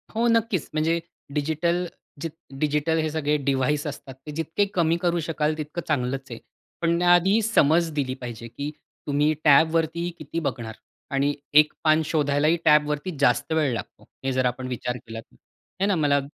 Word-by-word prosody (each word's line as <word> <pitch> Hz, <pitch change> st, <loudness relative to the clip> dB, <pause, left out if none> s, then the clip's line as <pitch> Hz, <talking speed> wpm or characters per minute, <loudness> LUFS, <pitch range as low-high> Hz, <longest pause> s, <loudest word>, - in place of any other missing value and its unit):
हो 235 Hz, +2 st, +2 dB
नक्कीच, 230 Hz, -6 st, +1 dB
म्हणजे 160 Hz, +2 st, +1 dB, 0.3 s
डिजिटल 160 Hz, +4 st, 0 dB, 0.4 s
जे 165 Hz, -, -2 dB, 0.3 s
डिजिटल 150 Hz, +2 st, +1 dB
हे 155 Hz, 0 st, 0 dB
सगळे 150 Hz, -1 st, 0 dB
डिव्हाइस 140 Hz, +2 st, +1 dB
असतात 140 Hz, -2 st, -7 dB
ते 150 Hz, -, -6 dB
जितके 165 Hz, +6 st, 0 dB
कमी 170 Hz, -1 st, +2 dB
करू 175 Hz, -1 st, +1 dB
शकाल 155 Hz, -1 st, -1 dB
तितकं 155 Hz, +3 st, -4 dB
चांगलंच 135 Hz, -2 st, -1 dB
आहे. 115 Hz, -, -6 dB, 0.4 s
पण 170 Hz, 0 st, +2 dB
त्या 175 Hz, 0 st, +5 dB
आधी 190 Hz, +5 st, +4 dB
समज 170 Hz, -6 st, +3 dB
दिली 135 Hz, -3 st, -1 dB
पाहिजे, 115 Hz, -1 st, -7 dB
की 140 Hz, +6 st, -5 dB, 0.4 s
तुम्ही 145 Hz, +2 st, +2 dB
टॅबवरती 160 Hz, +3 st, +3 dB
किती 155 Hz, +2 st, -4 dB
बघणार 115 Hz, -8 st, -4 dB, 0.4 s
आणि 140 Hz, +1 st, +2 dB, 0.3 s
एक 150 Hz, -, -5 dB
पान 155 Hz, 0 st, +4 dB
शोधायलाही 150 Hz, +1 st, +2 dB
टॅबवरती 150 Hz, +2 st, +3 dB
जास्त 145 Hz, +2 st, +2 dB
वेळ 150 Hz, -5 st, +2 dB
लागतो. 110 Hz, -5 st, -7 dB, 0.2 s
हे 135 Hz, -, +1 dB
जर 130 Hz, 0 st, +1 dB
आपण 125 Hz, +1 st, -2 dB
विचार 125 Hz, 0 st, -3 dB
केलात 115 Hz, -1 st, -9 dB
आहे 195 Hz, -, -7 dB
ना 200 Hz, -, +2 dB
मला 145 Hz, -3 st, +3 dB
150 Hz, 165 wpm, -25 LUFS, 140-165 Hz, 0.4 s, त्या